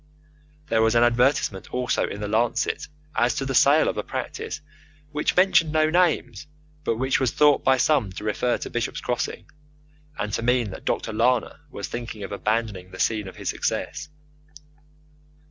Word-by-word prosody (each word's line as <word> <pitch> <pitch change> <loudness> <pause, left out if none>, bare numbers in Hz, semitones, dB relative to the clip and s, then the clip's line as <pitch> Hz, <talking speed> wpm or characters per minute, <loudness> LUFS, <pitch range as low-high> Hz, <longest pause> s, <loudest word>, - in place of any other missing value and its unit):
There 115 -2 +3
was 110 +1 +3
an 115 - +5
advertisement 120 -4 +1
also 125 -1 0
in 100 - -6
the 105 - -2
Lancet 120 +6 0 0.3
as 120 -1 +2
to 135 - -2
the 135 - -2
sale 145 +4 +5
of - - -1
a - - -1
practice - - -5 0.5
which 150 0 0
mentioned 180 -4 +4
no 155 0 +2
names, 155 - +1 0.4
but 115 - 0
which 130 +2 +1
was 130 - +2
thought 150 -1 +4
by 130 0 +4
some 130 -6 +2
to 105 - -7
refer 120 +3 0
to - - -6
Bishop's 120 0 -2
Crossing, 125 -1 -3 0.7
and 105 0 -3
to - - -1
mean 120 -3 +1
that - - -10
Dr. 110 - -1
Lana 125 +4 +1
was 100 -7 -6
thinking 115 -3 -6
of 95 - -6
abandoning 105 -3 -2
the 95 0 -11
scene 105 -3 0
of 95 - -9
his - - -4
success. 150 - -3
120 Hz, 175 wpm, -24 LUFS, 110-135 Hz, 0.7 s, an